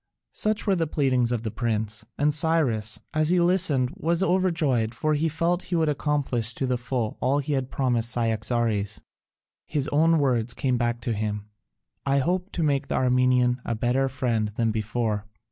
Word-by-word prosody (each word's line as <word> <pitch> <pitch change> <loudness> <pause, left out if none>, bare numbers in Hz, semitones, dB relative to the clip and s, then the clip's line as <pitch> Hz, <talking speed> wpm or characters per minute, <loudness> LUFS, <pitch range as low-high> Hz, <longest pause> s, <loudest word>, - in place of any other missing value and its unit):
Such 215 0 0
were 200 -3 +3
the 165 -2 0
pleadings 130 -5 +1
of 120 -2 -1
the 110 - -3
prince, 110 -2 -2
and 145 +1 +2
Cyrus, 145 -9 +1
as 155 0 +2
he 180 0 +3
listened, 170 -8 +2
was 170 +3 0
overjoyed, 160 -12 +1
for 155 +5 0
he 155 +2 +1
felt 170 +3 0
he 175 - -2
would 160 -2 +2
accomplish 135 -6 0
to 135 - -2
the 125 -1 -1
full 120 -3 -3
all 135 +3 +1
he 145 +1 -2
had 130 -2 -1
promised 120 -4 0
Cyaxares; 115 -2 -1 0.7
his 145 -2 -1
own 165 +3 +3
words 120 -5 +1
came 130 -2 0
back 120 -1 -1
to 120 - -1
him, 105 -1 -3 0.6
"I 140 0 +1
hope 180 +7 0
to 170 - -1
make 140 -2 +1
the - - -2
Armenian 125 -1 +2
a 115 - -2
better 125 +4 +1
friend 120 -5 -1
than 115 -1 +1
before." 110 -1 -2
130 Hz, 180 wpm, -25 LUFS, 115-155 Hz, 0.7 s, were